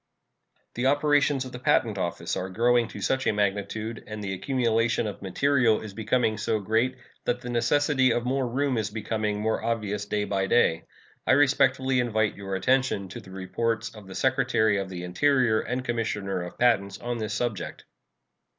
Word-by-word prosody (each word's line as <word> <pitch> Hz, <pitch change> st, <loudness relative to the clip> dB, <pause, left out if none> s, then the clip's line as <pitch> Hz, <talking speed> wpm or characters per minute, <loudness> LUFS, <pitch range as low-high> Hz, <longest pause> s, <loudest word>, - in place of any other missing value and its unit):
The 120 Hz, +2 st, 0 dB
operations 145 Hz, -1 st, +2 dB
of 130 Hz, -, -8 dB
the 125 Hz, -, -7 dB
Patent 110 Hz, -5 st, +2 dB
Office 85 Hz, -2 st, -2 dB
are 95 Hz, -, -3 dB
growing 120 Hz, +4 st, +2 dB
to 105 Hz, -, -9 dB
such 130 Hz, +6 st, 0 dB
a -, -, +4 dB
magnitude 105 Hz, +2 st, -2 dB
and 110 Hz, 0 st, -6 dB
the 95 Hz, -1 st, -3 dB
accumulation 115 Hz, 0 st, +1 dB
of 105 Hz, -2 st, -5 dB
material 120 Hz, +4 st, +2 dB
is 105 Hz, -2 st, -8 dB
becoming 110 Hz, +1 st, 0 dB
so 110 Hz, 0 st, 0 dB
great 115 Hz, +6 st, 0 dB, 0.3 s
that 120 Hz, 0 st, 0 dB
the 125 Hz, -1 st, -5 dB
necessity 130 Hz, +3 st, +2 dB
of 120 Hz, +1 st, 0 dB
more 130 Hz, 0 st, 0 dB
room 130 Hz, 0 st, 0 dB
is 110 Hz, -1 st, -2 dB
becoming 105 Hz, -1 st, -2 dB
more 110 Hz, +1 st, -1 dB
obvious 105 Hz, -3 st, -2 dB
day 105 Hz, 0 st, 0 dB
by 95 Hz, -1 st, -1 dB
day. 80 Hz, -7 st, +2 dB, 0.4 s
I -, -, +5 dB
respectfully 135 Hz, -2 st, +3 dB
invite 110 Hz, -3 st, +1 dB
your 95 Hz, -1 st, -5 dB
attention 130 Hz, -2 st, +1 dB
to -, -, -7 dB
the -, -, -14 dB
reports 105 Hz, +5 st, -2 dB
of 105 Hz, -3 st, -12 dB
the 95 Hz, -, -9 dB
Secretary 110 Hz, -2 st, +2 dB
of 95 Hz, -1 st, -4 dB
the 90 Hz, -1 st, -6 dB
Interior 120 Hz, +4 st, +2 dB
and 125 Hz, +1 st, -3 dB
Commissioner 105 Hz, -6 st, -2 dB
of 90 Hz, -, -8 dB
Patents 100 Hz, -5 st, +2 dB
on 120 Hz, +1 st, -4 dB
this 110 Hz, -1 st, -3 dB
subject. 120 Hz, -5 st, -3 dB
115 Hz, 180 wpm, -26 LUFS, 100-125 Hz, 0.4 s, I